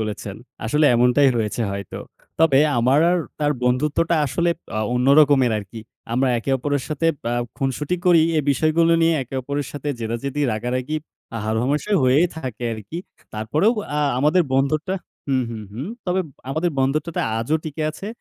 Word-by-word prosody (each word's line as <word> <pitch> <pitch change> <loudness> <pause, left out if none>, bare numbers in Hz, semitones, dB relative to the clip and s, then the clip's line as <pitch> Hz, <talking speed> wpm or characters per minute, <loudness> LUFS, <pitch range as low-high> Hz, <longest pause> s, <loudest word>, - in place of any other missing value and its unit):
বলেছেন। 105 -2 -4 0.3
আসলে 150 +7 +2
এমনটাই 125 +4 +4
রয়েছে 110 +1 -1
হয়তো। 100 -1 -6 0.4
তবে 150 -5 +5 0.2
আমার 130 +5 +3
আর 180 - +3 0.2
তার 150 0 +2
বন্ধুত্বটা 150 +6 +1
আসলে 170 +6 0 0.3
অ - - 0 0.2
অন্য 125 +1 +1
রকমের 135 -5 +4
আরকি। 105 +2 -9 0.3
আমরা 130 +2 +2
একে 115 - -4
অপরের 145 0 -1
সাথে 155 +2 -1 0.2
অ্যা 120 - -1 0.2
খুনসুটি 140 +6 -1
করি। 170 -2 +6 0.2
এ - - +4
বিষয়গুলো 160 +4 +3
নিয়ে 165 0 +4
একে 130 +1 -10
অপরের 140 +1 -3
সাথে 145 0 -5
জেদাজেদি, 120 +6 -3
রাগারাগি, 125 +6 -2 0.5
হারহমেশা 125 - -1
হয়েই 135 +7 +4
থাকে 125 -6 -5
আরকি। 110 - -7 0.4
তারপরেও 150 - +1 0.2
আ - - +1 0.2
আমাদের 155 +6 +3
বন্ধুত্বটা 150 +7 +1 0.3
হু, 135 - +1 0.2
হু, 115 - -5 0.2
হুম। 130 - -5 0.2
তবে 180 +1 +1 0.3
আমাদের 160 +5 0
বন্ধুত্বটা 145 +5 0 0.2
আজও 135 +8 0
টিকে 155 0 -4
আছে 195 +6 -9
140 Hz, 155 wpm, -22 LUFS, 120-155 Hz, 0.5 s, করি